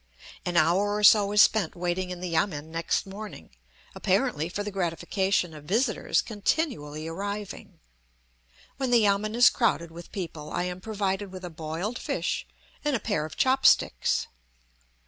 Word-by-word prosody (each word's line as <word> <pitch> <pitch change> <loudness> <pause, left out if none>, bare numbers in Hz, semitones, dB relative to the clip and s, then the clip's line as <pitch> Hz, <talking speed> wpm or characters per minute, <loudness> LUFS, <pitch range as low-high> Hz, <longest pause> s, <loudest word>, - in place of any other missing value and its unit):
An 175 -1 0
hour 185 +6 +3
or 210 - -2
so 205 -1 +7
is 210 0 +7
spent 205 -7 +1
waiting 180 +1 -2
in 180 -1 -6
the 180 - -3
yamen 160 -3 -1
next 165 +1 -1
morning, 200 - -9 0.4
apparently 155 +3 0
for 205 +3 -3
the 210 - -4
gratification 180 0 0
of 150 -1 -11
visitors 225 - +1
continually 205 - -2
arriving. 200 +4 -6 1.0
When 265 -2 -1
the 240 -1 +5
yamen 210 +2 +1
is 245 +1 +7
crowded 170 -8 0
with 170 +1 -11
people 160 -5 -6
I 175 - -1
am 180 0 -4
provided 200 -2 -2
with 185 -1 -8
a 175 - -7
boiled 165 +8 -4
fish - - -2 0.4
and 295 -2 +1
a - - 0
pair 205 -10 -1
of 155 - -9
chop 265 +1 +2
sticks. - - +3
190 Hz, 160 wpm, -27 LUFS, 170-210 Hz, 1.0 s, so